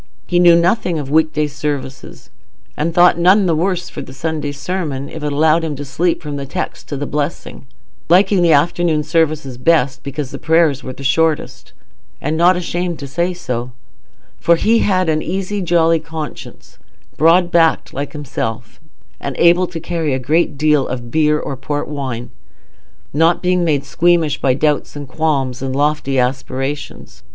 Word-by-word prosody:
He 175 Hz, -, +1 dB
knew 175 Hz, -1 st, +7 dB
nothing 175 Hz, 0 st, +1 dB
of 140 Hz, -2 st, -5 dB
weekday 155 Hz, -1 st, +2 dB
services, 145 Hz, -2 st, -6 dB, 0.4 s
and 160 Hz, +3 st, -1 dB
thought 175 Hz, 0 st, +4 dB
none 190 Hz, +4 st, +5 dB
the 170 Hz, -3 st, +2 dB
worse 180 Hz, +1 st, -2 dB
of -, -, -6 dB
the 130 Hz, -, -10 dB
Sunday 155 Hz, -1 st, -3 dB
sermon 145 Hz, -2 st, -4 dB
if 160 Hz, -, -8 dB
it 150 Hz, -, -1 dB
allowed 155 Hz, +3 st, +3 dB
him 155 Hz, -2 st, -3 dB
to 145 Hz, +1 st, -6 dB
sleep 165 Hz, +6 st, -1 dB
from 145 Hz, -2 st, -5 dB
the 140 Hz, -, -5 dB
text 180 Hz, +6 st, -5 dB
to 145 Hz, -, -3 dB
the 145 Hz, -, -3 dB
blessing; 145 Hz, -2 st, -4 dB, 0.4 s
liking 190 Hz, +2 st, +4 dB
the 170 Hz, -1 st, +4 dB
afternoon 160 Hz, +1 st, +2 dB
service 155 Hz, -5 st, 0 dB
best, 140 Hz, -1 st, +1 dB
because 140 Hz, -1 st, -5 dB
the -, -, -7 dB
prayers 160 Hz, -4 st, +2 dB
were 130 Hz, -, -6 dB
the 135 Hz, -, -10 dB
shortest, 160 Hz, +3 st, 0 dB, 0.5 s
and 150 Hz, +3 st, -2 dB
not 175 Hz, +3 st, +4 dB
ashamed 175 Hz, -1 st, -3 dB
to 140 Hz, -, -7 dB
say 170 Hz, +6 st, -1 dB
so; 125 Hz, -8 st, -5 dB, 0.7 s
for 170 Hz, -, +4 dB
he 225 Hz, +7 st, +2 dB
had 185 Hz, -4 st, +1 dB
an 155 Hz, -1 st, +1 dB
easy, 195 Hz, +4 st, -3 dB
jolly 165 Hz, -2 st, +2 dB
conscience, 160 Hz, -1 st, -9 dB, 0.4 s
broad 170 Hz, +3 st, +4 dB
backed 165 Hz, -1 st, +2 dB
like 140 Hz, +1 st, -5 dB
himself, 115 Hz, -6 st, -5 dB, 0.4 s
and 140 Hz, -2 st, -5 dB
able 175 Hz, +2 st, +4 dB
to 170 Hz, -2 st, -6 dB
carry 165 Hz, -4 st, -2 dB
a -, -, -1 dB
great 150 Hz, +3 st, 0 dB
deal 150 Hz, -1 st, +2 dB
of 120 Hz, -2 st, -6 dB
beer 150 Hz, -1 st, +2 dB
or 140 Hz, -, -5 dB
port 145 Hz, +3 st, -4 dB
wine, 130 Hz, -4 st, -5 dB, 0.8 s
not 165 Hz, +5 st, +2 dB
being 180 Hz, 0 st, +2 dB
made 145 Hz, -4 st, 0 dB
squeamish 165 Hz, -1 st, +1 dB
by 130 Hz, -2 st, +2 dB
doubts 150 Hz, +1 st, 0 dB
and 145 Hz, -1 st, -7 dB
qualms 135 Hz, -4 st, -1 dB
and 135 Hz, -1 st, -3 dB
lofty 145 Hz, -1 st, 0 dB
aspirations. 135 Hz, +2 st, -3 dB
155 Hz, 170 wpm, -17 LUFS, 140-170 Hz, 0.8 s, knew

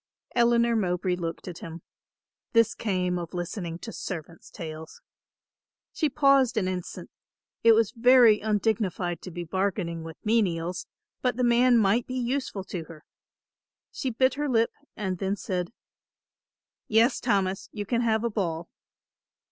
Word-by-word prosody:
Eleanor 235 Hz, -1 st, +3 dB
Mowbray 180 Hz, -3 st, 0 dB
looked 170 Hz, 0 st, -5 dB
at 175 Hz, -2 st, -7 dB
him. 165 Hz, 0 st, -9 dB, 0.7 s
This 230 Hz, -1 st, +4 dB
came 180 Hz, -4 st, -1 dB
of 170 Hz, 0 st, -7 dB
listening 175 Hz, -1 st, -4 dB
to 225 Hz, +5 st, -8 dB
servants' 165 Hz, -3 st, -7 dB
tales. 160 Hz, -1 st, -8 dB, 0.9 s
She 310 Hz, -, +1 dB
paused 275 Hz, -4 st, +3 dB
an 190 Hz, -4 st, +1 dB
instant; 185 Hz, -1 st, -5 dB, 0.5 s
it 230 Hz, 0 st, +8 dB
was 220 Hz, -2 st, +3 dB
very 245 Hz, -3 st, +6 dB
undignified 205 Hz, -5 st, -1 dB
to -, -, -8 dB
be 175 Hz, 0 st, -5 dB
bargaining 180 Hz, -1 st, -2 dB
with 165 Hz, 0 st, -9 dB
menials, 185 Hz, -5 st, 0 dB, 0.3 s
but 250 Hz, -2 st, 0 dB
the 250 Hz, -, +1 dB
man 240 Hz, +1 st, +5 dB
might 220 Hz, +2 st, +2 dB
be 255 Hz, -, -5 dB
useful 250 Hz, -5 st, -2 dB
to 175 Hz, -3 st, -6 dB
her; 160 Hz, -2 st, -13 dB, 0.9 s
she 265 Hz, -, -3 dB
bit 260 Hz, +2 st, +2 dB
her 290 Hz, +1 st, -2 dB
lip 230 Hz, -2 st, +2 dB, 0.3 s
and 190 Hz, -4 st, -3 dB
then 195 Hz, +1 st, 0 dB
said, 180 Hz, -2 st, -3 dB, 1.2 s
"Yes, 225 Hz, +2 st, +3 dB
Thomas, 195 Hz, -3 st, 0 dB
you 205 Hz, -1 st, -5 dB
can 235 Hz, +3 st, 0 dB
have 220 Hz, -1 st, +1 dB
a 235 Hz, -, +1 dB
boll." 170 Hz, -5 st, -2 dB
200 Hz, 145 wpm, -27 LUFS, 175-235 Hz, 1.2 s, it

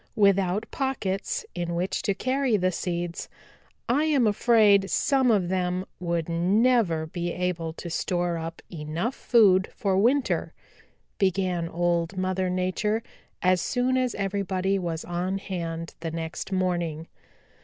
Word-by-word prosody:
Without 200 Hz, 0 st, +3 dB
pockets 225 Hz, -8 st, -2 dB
in 170 Hz, -1 st, -3 dB
which 180 Hz, +3 st, -1 dB
to 200 Hz, -, 0 dB
carry 255 Hz, +1 st, +1 dB
the 185 Hz, -1 st, +1 dB
seeds, 175 Hz, -1 st, -3 dB, 0.6 s
I 285 Hz, +6 st, +2 dB
am 285 Hz, -6 st, +3 dB
afraid 210 Hz, -2 st, +4 dB
some 265 Hz, +3 st, +2 dB
of 195 Hz, -6 st, +2 dB
them 180 Hz, 0 st, -1 dB
would 170 Hz, -2 st, -1 dB
never 180 Hz, 0 st, +2 dB
be 175 Hz, +2 st, -3 dB
able 175 Hz, -2 st, -2 dB
to 175 Hz, -, -8 dB
store 175 Hz, +1 st, -1 dB
up 165 Hz, 0 st, -6 dB
enough 165 Hz, -, -3 dB
food 195 Hz, -8 st, +4 dB
for 195 Hz, -2 st, +1 dB
winter," 255 Hz, +6 st, +1 dB, 0.6 s
began 185 Hz, -3 st, +1 dB
Old 170 Hz, +1 st, 0 dB
Mother 185 Hz, 0 st, 0 dB
Nature, 185 Hz, +5 st, 0 dB, 0.4 s
as 185 Hz, 0 st, +3 dB
soon 255 Hz, 0 st, 0 dB
as 255 Hz, -2 st, 0 dB
everybody 195 Hz, -1 st, -1 dB
was 165 Hz, -3 st, -3 dB
on 180 Hz, +2 st, -2 dB
hand 165 Hz, -4 st, -5 dB
the 165 Hz, +1 st, -4 dB
next 165 Hz, +3 st, -5 dB
morning. 175 Hz, -4 st, -1 dB
185 Hz, 135 wpm, -26 LUFS, 170-205 Hz, 0.6 s, afraid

